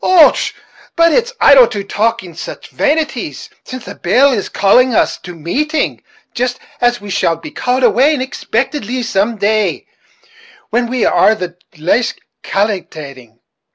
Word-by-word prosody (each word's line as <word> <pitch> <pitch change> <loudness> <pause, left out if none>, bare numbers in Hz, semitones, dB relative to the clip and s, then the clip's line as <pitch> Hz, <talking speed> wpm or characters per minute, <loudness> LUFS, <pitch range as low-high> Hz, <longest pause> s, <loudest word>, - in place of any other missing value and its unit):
Och! 355 -4 +6 0.6
but 335 0 +4
it's 485 0 +1
idle 270 -4 +7
to 205 -2 -4
talk 225 +3 -1
of 170 -2 -11
sich - - -8
vanities, 305 +1 -2 0.2
while 255 0 -6
the - - -9
bell 255 +10 +3
is 215 -6 -2
calling 245 +5 +3
us - - +1
to 180 -1 -10
mateing 290 - -2 0.3
jist 245 +1 -1 0.2
as 245 0 +2
we 205 -1 -8
shall 170 -2 +1
be 165 - -10
called 255 +1 -1
away 275 +5 +4
unexpictedly 255 -1 -3
some 220 +1 0
day, 215 +1 0 0.9
when 240 +1 +1
we 250 -1 0
are 220 - +4
the 180 -4 -6 0.2
laist 205 +10 0 0.2
calkilating. 150 - -4
230 Hz, 145 wpm, -15 LUFS, 195-260 Hz, 0.9 s, idle